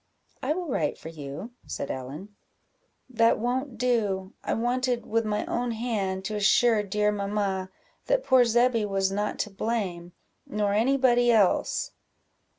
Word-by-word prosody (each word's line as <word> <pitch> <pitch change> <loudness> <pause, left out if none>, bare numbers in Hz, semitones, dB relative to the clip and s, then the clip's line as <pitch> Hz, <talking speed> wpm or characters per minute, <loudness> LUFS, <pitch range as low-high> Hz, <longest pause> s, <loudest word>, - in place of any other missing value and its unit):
"I - - 0
will 360 -1 -4
write 160 - -1
for 160 - -9
you," 150 - -7 0.2
said - - -4
Ellen. 150 +11 -7 0.7
"That 230 -3 +3
won't 250 +2 -2
do 210 -6 0
I - - -1
wanted, 245 +1 0
with 230 +1 0
my 210 0 -1
own 240 0 -1
hand, 200 -5 -2
to 215 - -3
assure 215 +2 +4
dear 210 +1 +1
mamma 200 -2 -2 0.4
that - - +2
poor 260 -2 +5
Zebby 240 -1 +3
was 195 -1 0
not 205 +1 -2
to 210 - -2
blame, 195 -5 -3 0.3
nor 205 -1 0
any 245 +6 +3
body 245 -2 +4
else." 210 -5 +2
215 Hz, 150 wpm, -27 LUFS, 195-240 Hz, 0.7 s, poor